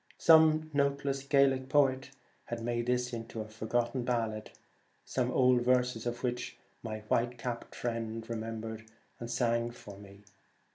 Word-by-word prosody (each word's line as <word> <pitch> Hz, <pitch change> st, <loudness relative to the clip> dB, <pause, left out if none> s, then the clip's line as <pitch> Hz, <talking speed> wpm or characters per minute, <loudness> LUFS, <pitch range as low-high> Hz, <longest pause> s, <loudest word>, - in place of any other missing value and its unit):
Some 155 Hz, -1 st, +5 dB
noteless 140 Hz, -1 st, 0 dB
Gaelic 135 Hz, -1 st, +2 dB
poet 135 Hz, -1 st, +3 dB, 0.4 s
had 120 Hz, -1 st, -5 dB
made 120 Hz, 0 st, -1 dB
this 125 Hz, 0 st, 0 dB
into 115 Hz, -1 st, -6 dB
a 110 Hz, -, -6 dB
forgotten 120 Hz, +3 st, -1 dB
ballad, 115 Hz, -3 st, -2 dB, 0.6 s
some 125 Hz, -1 st, -1 dB
odd 125 Hz, -1 st, +4 dB
verses 125 Hz, -1 st, +1 dB
of 120 Hz, +1 st, -4 dB
which 125 Hz, -1 st, -3 dB, 0.2 s
my 110 Hz, -2 st, -5 dB
white 120 Hz, +3 st, 0 dB
capped 120 Hz, -1 st, -5 dB
friend 115 Hz, -1 st, -3 dB
remembered 110 Hz, -1 st, -5 dB, 0.3 s
and 120 Hz, -, -6 dB
sang 115 Hz, -1 st, +1 dB
for 110 Hz, -4 st, -11 dB
me. 100 Hz, 0 st, -14 dB
120 Hz, 140 wpm, -31 LUFS, 115-130 Hz, 0.6 s, Some